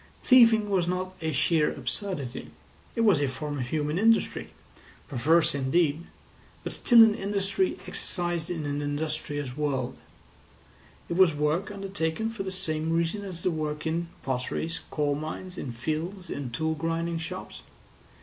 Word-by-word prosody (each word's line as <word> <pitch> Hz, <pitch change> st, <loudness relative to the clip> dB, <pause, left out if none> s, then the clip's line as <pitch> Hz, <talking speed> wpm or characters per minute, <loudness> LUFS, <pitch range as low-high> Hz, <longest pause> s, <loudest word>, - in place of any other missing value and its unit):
Thieving 230 Hz, -5 st, +6 dB
was 180 Hz, -3 st, +2 dB
not 185 Hz, +1 st, -2 dB
a 160 Hz, -1 st, -1 dB
sheer 155 Hz, +2 st, +3 dB
absurdity. 140 Hz, -1 st, -3 dB, 0.5 s
It 230 Hz, -, +1 dB
was 205 Hz, -10 st, +5 dB
a 140 Hz, -, +2 dB
form 145 Hz, +2 st, -4 dB
of 125 Hz, -, -2 dB
human 150 Hz, +4 st, -1 dB
industry, 225 Hz, +1 st, +2 dB, 0.6 s
perverse 155 Hz, +5 st, +3 dB
indeed, 145 Hz, +4 st, +1 dB, 0.6 s
but -, -, -4 dB
still 235 Hz, -2 st, +7 dB
an 220 Hz, -1 st, +5 dB
industry 200 Hz, -, 0 dB
exercised 175 Hz, -2 st, -3 dB
in 165 Hz, -4 st, -3 dB
an 145 Hz, 0 st, -2 dB
industrious 145 Hz, -2 st, -3 dB
world; 140 Hz, -4 st, -1 dB, 1.1 s
it 170 Hz, -, -2 dB
was 185 Hz, -5 st, +6 dB
work 150 Hz, +7 st, 0 dB
undertaken 195 Hz, 0 st, -2 dB
for 225 Hz, -, -6 dB
the 195 Hz, -, -3 dB
same 160 Hz, -4 st, -2 dB
reason 170 Hz, +5 st, 0 dB
as 180 Hz, -4 st, -7 dB
the 185 Hz, -, +2 dB
work 150 Hz, -1 st, -3 dB
in 165 Hz, +2 st, -1 dB, 0.2 s
potteries, 135 Hz, +5 st, -2 dB
in -, -, -11 dB
coal 145 Hz, -2 st, 0 dB
mines, 155 Hz, +5 st, -5 dB
in 130 Hz, -, -5 dB
fields, 160 Hz, -, -4 dB
in 140 Hz, -3 st, -4 dB
tool 160 Hz, +7 st, -1 dB
grinding 165 Hz, +1 st, -1 dB
shops. 165 Hz, -, -6 dB
165 Hz, 150 wpm, -28 LUFS, 145-185 Hz, 1.1 s, still